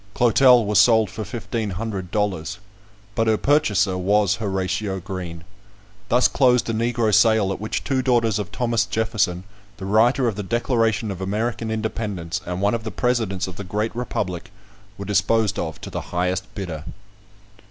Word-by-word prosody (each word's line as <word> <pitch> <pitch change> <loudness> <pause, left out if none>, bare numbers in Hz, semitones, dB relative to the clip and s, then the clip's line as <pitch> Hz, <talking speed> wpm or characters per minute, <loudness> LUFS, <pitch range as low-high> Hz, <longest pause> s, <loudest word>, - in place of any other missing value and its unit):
Clotel 125 0 +5
was 105 0 +3
sold 110 -2 +5
for 110 - -5
fifteen 115 -1 -4
hundred 95 -1 -4
dollars, 100 -2 -2 0.6
but 115 +2 0
her 110 -1 +3
purchaser 105 -11 +2
was 100 +1 +2
Horatio 95 -1 -2
Green. 90 -3 -6 0.7
Thus 125 +2 +4
closed 125 -3 +3
a - - -3
Negro 115 -1 0
sale, 110 -4 +4
at 95 - -8
which 110 - -3
two 135 -2 0
daughters 115 -5 +2
of 100 - -5
Thomas 115 -2 0
Jefferson, 110 -6 0 0.3
the 95 - -7
writer 120 +6 +3
of 110 - -1
the 105 - -3
Declaration 115 -1 0
of 95 -1 -7
American 110 +4 -2
Independence, 105 -5 -3
and 90 +1 -3
one 100 - +3
of 115 -1 -2
the 110 - -4
presidents 110 -7 -1
of 90 -2 -9
the 100 - -5
great 105 +4 -2
republic, 90 -7 -3 0.5
were 100 - -6
disposed 105 0 +1
of - - -4
to - - -8
the - - -3
highest 90 +2 -2
bidder! 85 -7 -5
105 Hz, 165 wpm, -22 LUFS, 95-115 Hz, 0.7 s, Clotel